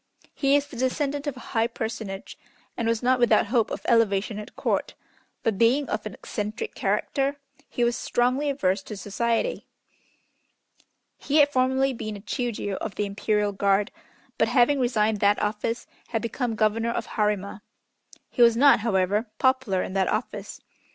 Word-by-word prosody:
He 275 0 +2
is 285 0 +2
the 285 - -12
descendant 280 +3 -1
of 275 -3 -3
a - - -11
high 225 -1 +2
personage, 220 -4 -5 0.4
and 230 - -2
was 230 +1 0
not 255 +1 +3
without 240 -2 +4
hope 230 0 +1
of - - -5
elevation 215 -2 +2
at 210 - -10
Court, - - -1 0.5
but, 220 -4 0
being 255 +5 +3
of 215 0 -2
an 205 - -8
eccentric 215 - -5
character, 280 0 -1 0.3
he 240 - -1
was 240 0 +2
strongly 255 +4 0
averse 195 -8 0
to 205 +2 -8
society. 230 - -1 1.5
He 290 - 0
had 290 -1 +6
formerly 265 +1 +2
been 215 -3 -5
a - - -10
Chiûjiô 210 -2 -3
of 215 - -5
the 210 - -1
Imperial 205 +1 0
Guard, 200 +1 +1 0.5
but - - +4
having 270 +2 +3
resigned 220 -4 +1
that 205 +1 +3
office, 225 +2 -2 0.2
had 225 -2 -2
become 235 0 -2
Governor 220 +2 +1
of 235 - -2
Harima. 210 -2 -1 0.7
He 245 - -1
was 235 -1 +6
not, 280 -1 +6
however, 205 0 +1
popular 260 -8 +2
in - - -6
that 195 -1 +1
office. - - -4
230 Hz, 165 wpm, -25 LUFS, 210-255 Hz, 1.5 s, had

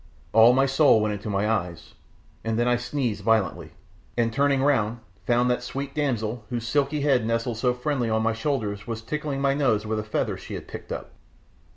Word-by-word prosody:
All 115 +2 +8
my 135 +2 +4
soul 135 -3 +5
went 105 0 0
into 105 +1 -5
my 100 +1 0
eyes, 90 -7 -2 0.5
and 115 0 -1
then 120 +1 +2
I 125 - +4
sneezed 120 -4 -2
violently, 110 -5 +1 0.4
and 115 -1 +1
turning 140 +1 +2
round, 120 -5 +1 0.3
found 120 +1 +3
that 125 - 0
sweet 135 +3 -5
damsel 120 -6 -1
whose 120 -2 -3
silky 145 +3 +1
head 135 -5 +3
nestled 115 +1 -1
so 125 0 +1
friendly 125 -2 -1
on 110 0 +1
my 115 0 +2
shoulder 115 -3 -1
was 115 -1 -4
tickling 150 +2 -3
my 140 0 +3
nose 125 -7 +1
with 110 0 -1
a - - -3
feather 105 - -2
she - - -7
had - - -8
picked - - -9
up. - - -5
120 Hz, 200 wpm, -25 LUFS, 110-135 Hz, 0.5 s, All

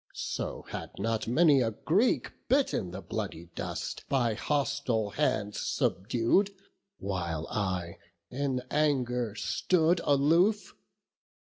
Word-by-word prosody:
so - - -4
had - - -5
not 110 +2 -1
many 145 +2 +5
a 115 - +2
Greek 180 - +1 0.2
Bitten 265 - +2
the - - -7
bloody 85 +1 -5
dust, - - -4
by 120 -5 +2
hostile 135 -5 0
hands 105 +1 0
Subdued, 115 - +1 0.5
while 85 -5 -3
I 90 -5 -2 0.3
in 130 -1 -1
anger 125 -7 +1
stood 170 +9 +2
aloof. 170 +8 +3
125 Hz, 105 wpm, -30 LUFS, 105-155 Hz, 0.5 s, many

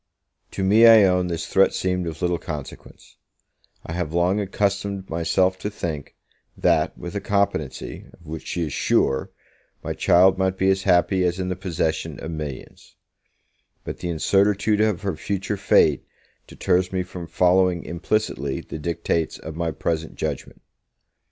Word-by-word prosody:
To 95 - -4
me, 110 +5 +6
I 110 -2 +8
own, 90 -1 +2
this 85 -2 -3
threat 95 +3 +3
seemed 90 -1 -1
of 80 +2 -6
little 90 -1 +1
consequence; 75 -6 -9 0.7
I - - -7
have 85 -2 -3
long 90 +4 +2
accustomed 100 -1 -2
myself 90 +3 +1
to 105 - -3
think, 80 -8 -5 0.4
that, - - +1
with 85 - -7
a 100 - -3
competency, 80 -9 -2
of 85 - -20
which 80 0 -7
she 85 - -2
is 75 -4 -4
sure, 65 - +1 0.5
my - - -3
child 95 +2 +4
might 95 0 0
be 95 0 +3
as 95 0 0
happy 95 0 +3
as 90 0 0
in 90 -1 -2
the 90 - -2
possession 85 -4 -2
of 80 - -6
millions; 75 -4 -8 0.9
but - - -6
the 90 - -4
incertitude 100 +5 +2
of 105 -3 +1
her 95 -4 -1
future 100 +5 -3
fate 95 - +3 0.4
deters 90 +1 0
me 95 -1 -1
from 90 -1 -8
following 90 +1 +2
implicitly 85 -6 -2
the 80 - -8
dictates 85 0 -2
of 80 -1 -8
my 85 0 -1
present 80 +1 -3
judgement. - - -5
90 Hz, 160 wpm, -23 LUFS, 80-95 Hz, 0.9 s, I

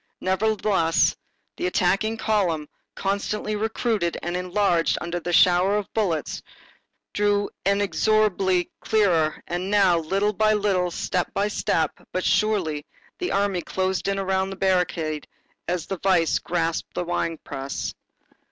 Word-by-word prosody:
Nevertheless, 190 -3 +2 0.4
the 355 - -1
attacking 215 - +1
column, 180 -10 0 0.3
constantly 200 +2 -2
recruited 215 -4 -1
and 175 +1 -2
enlarged 180 -1 +1
under 170 +1 -3
the 175 +1 -4
shower 180 +3 +5
of 210 - -5
bullets, 180 -9 -1 0.7
drew 205 0 +1 0.2
inexorably 200 -2 +2 0.2
nearer, 175 -8 +2
and 180 +2 -3
now, 195 -4 +4
little 195 +6 0
by 215 +1 +3
little, 195 -4 +1
step 180 +1 -2
by 205 +1 +1
step, 160 -6 0 0.2
but 185 - -2
surely, 185 -9 +1 0.4
the 360 - -2
army 200 -2 +1
closed 190 +2 -2
in 195 0 0
around 190 0 0
the 195 - -6
barricade 180 -5 0 0.4
as 175 -2 -1
the 195 -3 -5
vice 180 -3 +2
grasps 165 -1 -2
the - - -1
wine 170 -1 -2
press. 135 +1 -4
190 Hz, 130 wpm, -24 LUFS, 175-205 Hz, 0.7 s, shower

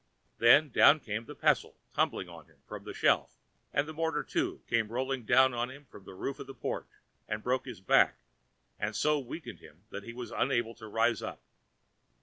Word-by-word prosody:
Then 140 +5 +6
down 145 +6 +7
came 115 -3 -4
the - - -10
pestle, - - +1 0.2
tumbling - - 0
on - - -12
him - - -26
from - - -9
a - - -4
shelf, - - +2 0.3
and 140 +2 +1
the 155 - -6
mortar, 160 -1 -1
too, 360 +2 -2
came 115 -2 +1
rolling 130 +2 -2
down 130 +3 +5
on 120 +1 -1
him 140 +2 -12
from 100 -6 -15
the 95 - -11
roof 135 +8 -4
of 135 - -8
the 135 - -9
porch - - -4 0.4
and 105 0 -3
broke 130 +1 0
his 125 -8 -8
back, 95 - +4 0.6
and 105 +1 -2
so 150 0 +2
weakened 140 +5 -8
him 80 +5 -17
that 100 - -5
he 115 +3 -9
was 125 0 -7
unable 120 -3 0
to 110 -1 -11
rise 115 0 +1
up. - - -7
125 Hz, 200 wpm, -31 LUFS, 110-140 Hz, 0.6 s, down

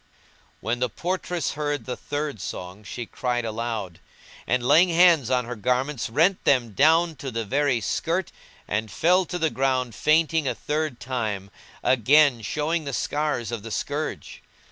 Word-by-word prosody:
When 120 +2 -1
the 125 0 0
portress 175 - -2
heard 145 -1 -3
the 125 - -3
third 145 -7 -4
song 90 +4 -7
she 120 +3 -6
cried 120 +1 -2
aloud; 110 -6 -4 0.5
and, 125 -1 +1
laying 175 +6 +6
hands 165 -6 +5
on 125 -2 +1
her 125 +1 -5
garments, 125 +4 -1
rent 165 +10 +2
them 125 -5 +2
down 160 - +3
to 135 +1 -5
the 115 -2 -3
very 140 +1 +1
skirt 170 - -1 0.4
and 110 +2 -2
fell 180 - +3
to 180 - -4
the 160 -2 0
ground 130 -1 0
fainting 155 +1 +2
a - - 0
third 150 -4 -2
time, 110 -6 -3 0.3
again 130 +1 +4
showing 155 +9 -1
the 140 - -4
scars 145 0 -1
of 115 -3 -4
the 115 - -8
scourge. 145 +7 -4
130 Hz, 160 wpm, -25 LUFS, 115-155 Hz, 0.5 s, laying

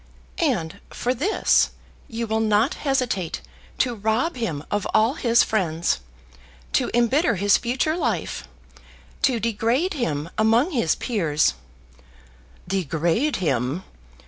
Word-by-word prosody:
"And 215 - -1
for 250 - -1
this 320 - +2 0.4
you 230 0 -3
will 220 0 0
not 220 +3 +2 0.2
hesitate 245 -11 0 0.4
to 250 -2 +1
rob 220 +9 0
him 190 - -3
of 205 -1 0
all 225 +4 +4
his 235 -5 +3
friends, 170 - 0 0.7
to - - +2
embitter 240 +4 +3
his 200 +2 +4
future 255 +6 0
life, 230 - -2 0.7
to 250 -4 +2
degrade 230 - 0
him 165 - -2
among 230 +9 +3
his 235 - +1
peers, 165 - +1 0.6
" - - -27 0.3
"Degrade 175 - 0
him! 140 0 -1
220 Hz, 120 wpm, -23 LUFS, 170-250 Hz, 0.7 s, all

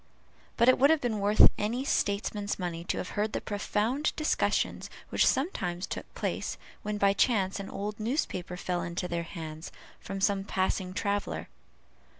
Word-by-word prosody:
But 235 - +4
it 255 - +6
would 280 +2 +6
have 320 -1 +5
been 235 -5 -1
worth 205 +2 +7
any 235 +6 -1
statesman's 205 -3 0
money 175 -2 -3
to - - -1
have - - -3
heard 210 +1 -1
the - - 0
profound 220 +7 0
discussions 310 - 0 0.2
which - - +3
sometimes 185 - 0
took - - -6
place, - - -2 0.2
when 210 0 -2
by 200 -1 +4
chance 200 -3 +2
an 195 - -5
old 210 +2 -4
newspaper 215 - -2
fell 180 -1 -1
into 175 +1 -3
their 170 -1 -1
hands 160 -1 -7 0.3
from 195 0 -5
some 195 0 +2
passing 185 -1 -1
traveller. 205 0 -2
200 Hz, 160 wpm, -29 LUFS, 185-220 Hz, 0.3 s, worth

